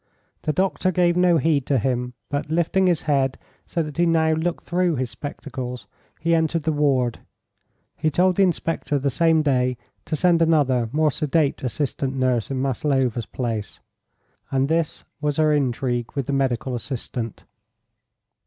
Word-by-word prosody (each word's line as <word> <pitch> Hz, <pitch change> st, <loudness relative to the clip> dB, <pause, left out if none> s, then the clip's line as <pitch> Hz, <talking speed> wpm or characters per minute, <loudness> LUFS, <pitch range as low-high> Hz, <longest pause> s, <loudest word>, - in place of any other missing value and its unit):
The 155 Hz, -, 0 dB
doctor 185 Hz, +2 st, +1 dB
gave 175 Hz, -1 st, +2 dB
no 180 Hz, -1 st, +4 dB
heed 150 Hz, -3 st, +1 dB
to 140 Hz, -, +2 dB
him, 125 Hz, +1 st, -1 dB
but, 145 Hz, +1 st, -3 dB
lifting 170 Hz, +4 st, +2 dB
his 175 Hz, -4 st, +1 dB
head 135 Hz, -3 st, +1 dB, 0.3 s
so 170 Hz, -, -1 dB
that 150 Hz, -1 st, -8 dB
he 175 Hz, 0 st, +3 dB
now 160 Hz, -1 st, +3 dB
looked 165 Hz, +2 st, -2 dB
through 175 Hz, -1 st, +1 dB
his 130 Hz, -2 st, -2 dB
spectacles, 130 Hz, -4 st, -6 dB, 0.3 s
he 170 Hz, +1 st, +1 dB
entered 160 Hz, 0 st, +1 dB
the 160 Hz, -, +1 dB
ward. 135 Hz, -5 st, +1 dB, 0.8 s
He 155 Hz, +1 st, 0 dB
told 180 Hz, +3 st, +2 dB
the -, -, +4 dB
inspector 165 Hz, -5 st, 0 dB
the 140 Hz, 0 st, 0 dB
same 160 Hz, +2 st, +3 dB
day 125 Hz, -3 st, +1 dB, 0.3 s
to 155 Hz, -, -2 dB
send 170 Hz, +1 st, +3 dB
another 135 Hz, -8 st, +3 dB
more 155 Hz, +1 st, +2 dB
sedate 145 Hz, 0 st, 0 dB
assistant 135 Hz, +1 st, -2 dB
nurse 130 Hz, -4 st, +1 dB
in 135 Hz, -1 st, -2 dB
Maslova's 130 Hz, -3 st, 0 dB
place. 115 Hz, -5 st, -4 dB, 0.7 s
And 135 Hz, +1 st, +1 dB
this 165 Hz, -1 st, 0 dB, 0.2 s
was 150 Hz, -1 st, 0 dB
her 155 Hz, -1 st, +4 dB
"intrigue" 125 Hz, -3 st, -1 dB
with 140 Hz, -3 st, -2 dB
the 140 Hz, -, -2 dB
medical 130 Hz, -2 st, 0 dB
assistant. 120 Hz, -2 st, -5 dB
145 Hz, 160 wpm, -23 LUFS, 130-165 Hz, 0.8 s, no